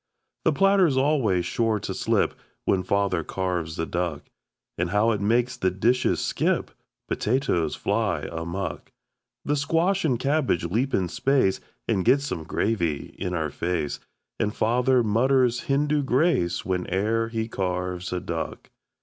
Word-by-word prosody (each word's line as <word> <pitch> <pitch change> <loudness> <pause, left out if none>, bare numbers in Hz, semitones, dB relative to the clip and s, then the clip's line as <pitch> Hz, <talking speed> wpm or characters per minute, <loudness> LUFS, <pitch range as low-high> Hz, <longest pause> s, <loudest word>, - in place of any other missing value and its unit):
The 160 - +5
platter's 190 -3 +4
always 130 - +2
sure 110 +3 0
to - - -4
slip - - +1 0.3
When 95 - +2
Father 95 -2 0
carves 90 -4 -3
a 80 - -1
duck. 85 -4 -2 0.5
And 85 +1 -1
how 105 +4 +3
it 105 -3 -1
makes 120 +4 +2
the 95 - +1
dishes 115 +7 +1
skip! - - 0 0.4
Potatoes 105 - 0
fly - - -1
amuck! 85 +4 -4 0.5
The 145 - +1
squash 165 +7 +1
and 130 -7 +1
cabbage 135 - +1
leap 115 +10 0
in 95 -2 +1
space 130 0 +1 0.3
We 95 - +1
get 135 +10 +4
some 85 - -4
gravy 85 -6 -1
in 90 - -2
our 80 -3 -1
face 85 -2 -2 0.4
And 105 -1 -1
Father 125 +2 +3
mutters 125 +3 +2
Hindu 145 +2 +2
grace 130 - +1
Whene'er 95 +5 0
he 110 -1 -2
carves 90 -3 -3
a 90 - -1
duck. 85 -2 -5
105 Hz, 140 wpm, -25 LUFS, 90-130 Hz, 0.5 s, The